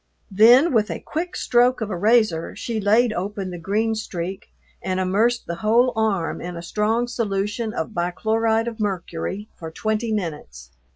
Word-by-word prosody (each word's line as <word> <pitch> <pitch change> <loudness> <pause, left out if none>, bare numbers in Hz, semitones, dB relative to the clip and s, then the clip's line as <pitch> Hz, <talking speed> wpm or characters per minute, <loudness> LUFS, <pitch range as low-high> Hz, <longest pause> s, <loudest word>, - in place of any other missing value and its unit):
Then 240 - +6
with 215 -2 +2
a - - -4
quick 345 +3 -4
stroke 245 +1 +2
of 215 -2 -3
a - - -2
razor 210 -4 +2
she 225 -2 -3
laid 220 +3 +3
open 195 0 -4
the 175 - -7
green 215 +6 0
streak 190 -3 -5 0.3
and 185 0 -2
immersed 215 +6 +1
the 170 - -5
whole 235 +6 +3
arm 205 -7 0
in 175 0 -6
a 170 - -7
strong 220 +6 0
solution 210 -1 -2
of 225 - -4
bichloride 220 +6 0
of 230 -1 -5
mercury 195 0 -3
for 160 - -6
twenty 220 +6 -2
minutes. 150 - -5
215 Hz, 165 wpm, -22 LUFS, 185-230 Hz, 0.3 s, Then